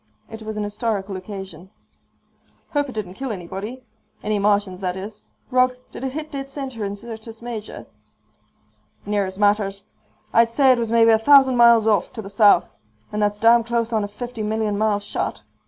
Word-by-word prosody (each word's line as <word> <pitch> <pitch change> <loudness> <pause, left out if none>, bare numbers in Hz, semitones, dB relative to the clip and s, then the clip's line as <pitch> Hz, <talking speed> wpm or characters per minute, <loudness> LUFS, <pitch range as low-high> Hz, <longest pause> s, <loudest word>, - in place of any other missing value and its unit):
It 225 0 -8
was 215 0 -6
an 210 - -1
historical 205 -2 -3
occasion. 190 -2 -8 1.0
"Hope 290 -1 0
it - - -7
didn't 195 -4 -4
kill 265 +4 -5
anybody. 205 +6 -6 0.4
Any 210 0 0
Martians, 200 -2 +1
that 185 -1 -3
is. 205 +2 -8 0.3
Rog, 255 0 +3 0.2
did - - -8
it 265 -1 -3
hit 310 +1 -6
dead 275 -1 -5
center 265 -5 -6
in 200 0 -3
Syrtis 225 +1 -8
Major?" 235 -3 -7 1.2
"Near 205 -1 0
as 190 0 -7
matters. 205 -1 +1 0.5
I'd 230 0 +5
say 265 +3 +4
it 250 - +3
was 230 -1 -2
maybe 230 -1 +5
a 220 - +4
thousand 265 +1 +6
miles 235 -2 +6
off, 210 -4 +2
to 220 - -6
the 195 - -9
south. 205 -3 +4 0.3
And 210 - -2
that's 205 0 +1
damn 230 +2 +5
close 235 0 -1
on 215 -2 +1
a - - -2
fifty 235 +3 -7
million 215 0 -1
mile 210 0 +1
shot. 205 - -4
220 Hz, 185 wpm, -22 LUFS, 205-235 Hz, 1.2 s, thousand